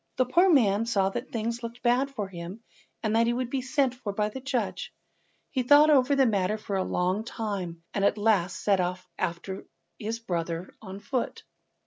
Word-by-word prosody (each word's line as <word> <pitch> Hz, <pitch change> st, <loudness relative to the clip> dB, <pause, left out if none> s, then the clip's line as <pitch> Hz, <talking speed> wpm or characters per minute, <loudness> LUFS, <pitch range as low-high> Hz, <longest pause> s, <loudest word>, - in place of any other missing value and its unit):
The 255 Hz, -, +2 dB
poor 350 Hz, +10 st, +4 dB
man 225 Hz, -, +4 dB
saw 195 Hz, -4 st, +2 dB
that 240 Hz, +6 st, -5 dB
things 230 Hz, +1 st, -2 dB
looked 235 Hz, +1 st, -7 dB
bad 250 Hz, +3 st, +3 dB
for 215 Hz, -8 st, -4 dB
him, 185 Hz, +4 st, -8 dB, 0.4 s
and 215 Hz, 0 st, +1 dB
that 230 Hz, +1 st, +4 dB
he 235 Hz, -, +2 dB
would 245 Hz, 0 st, -2 dB
be 270 Hz, -, 0 dB
sent 260 Hz, 0 st, +1 dB
for 245 Hz, -5 st, -5 dB
by 210 Hz, +1 st, 0 dB
the 240 Hz, -, -7 dB
judge. 265 Hz, -2 st, -2 dB, 0.6 s
He 265 Hz, -, 0 dB
thought 290 Hz, +4 st, +6 dB
over 280 Hz, 0 st, +4 dB
the 270 Hz, -1 st, +4 dB
matter 205 Hz, -2 st, +1 dB
for 210 Hz, -2 st, -4 dB
a 190 Hz, -, +1 dB
long 185 Hz, +4 st, 0 dB
time, 200 Hz, -8 st, -4 dB
and 195 Hz, -, -1 dB
at 200 Hz, -, +3 dB
last 205 Hz, -4 st, +2 dB
set 200 Hz, -2 st, +3 dB
off 180 Hz, 0 st, -2 dB
after 180 Hz, +3 st, -3 dB, 0.3 s
his 220 Hz, +2 st, -3 dB
brother 175 Hz, -5 st, -4 dB
on 195 Hz, -2 st, -8 dB
foot. 250 Hz, +3 st, -3 dB
220 Hz, 195 wpm, -27 LUFS, 195-250 Hz, 0.6 s, thought